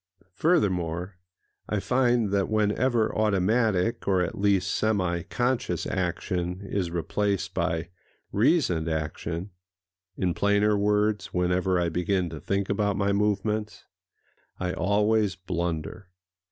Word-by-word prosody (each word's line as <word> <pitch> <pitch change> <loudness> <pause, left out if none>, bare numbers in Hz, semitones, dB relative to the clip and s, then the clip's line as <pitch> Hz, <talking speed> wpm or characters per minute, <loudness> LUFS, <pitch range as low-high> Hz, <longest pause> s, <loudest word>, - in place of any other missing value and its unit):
Furthermore, 90 - 0 0.5
I 105 - 0
find 120 -2 +2
that 100 -1 +1
whenever 110 +2 +1
automatic, 110 +1 +1
or 95 -2 +3
at 85 - -3
least 100 -2 +1
semi 95 -6 0
conscious, 125 +7 -1
action 90 0 -2
is 100 -3 -2
replaced 100 +3 -1
by 80 0 -1 0.4
reasoned 105 - +2
action—in 90 +3 -5
plainer 105 +3 +2
words, 105 0 +1
whenever 90 +1 +1
I 85 -1 +1
begin 90 +1 0
to 80 - -6
think 100 +3 -1
about 100 -1 0
my 100 0 +1
movements—I 105 -2 -4
always 105 0 +2
blunder. 85 0 -4
100 Hz, 105 wpm, -26 LUFS, 90-105 Hz, 0.5 s, or